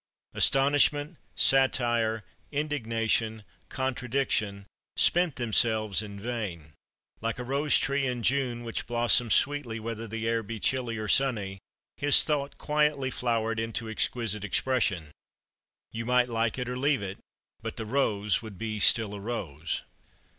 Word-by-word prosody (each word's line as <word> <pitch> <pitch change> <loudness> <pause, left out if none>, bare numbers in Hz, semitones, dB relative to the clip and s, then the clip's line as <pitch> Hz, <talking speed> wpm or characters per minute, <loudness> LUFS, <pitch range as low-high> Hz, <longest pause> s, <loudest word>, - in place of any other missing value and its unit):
Astonishment, 145 +3 +3 0.2
satire, 120 -5 +3 0.3
indignation, 115 -6 -1 0.3
contradiction, 125 -6 -1 0.3
spent 175 -4 +3
themselves 110 -3 +1
in 100 -2 -8
vain. 100 -9 -5 0.5
Like 115 +1 -2
a 125 - -4
rose 140 +4 +2
tree 140 0 +1
in 125 -2 -3
June, 125 -1 +1
which 115 -1 -4
blossoms 120 -1 +3
sweetly 140 -6 0
whether 115 0 -5
the 115 +1 -4
air 115 0 +1
be 110 +1 -6
chilly 120 -1 0
or 110 0 -4
sunny, 105 -6 +1 0.4
his 145 0 +5
thought 145 -2 -1
quietly 150 -3 +1
flowered 115 -3 -1
into 115 0 -3
exquisite 110 -1 -1
expression. 100 -8 0 0.8
You 115 +1 -5
might 125 0 +3
like 115 0 0
it 125 -1 -3
or 125 0 -3
leave 140 -5 +2
it. 100 0 -6 0.4
But 115 +1 -6
the 110 - -4
rose 105 -4 +1
would 110 -4 -9
be 110 0 -3
still 105 0 +4
a 100 - -6
rose. 85 -9 -4
115 Hz, 135 wpm, -28 LUFS, 110-130 Hz, 0.8 s, his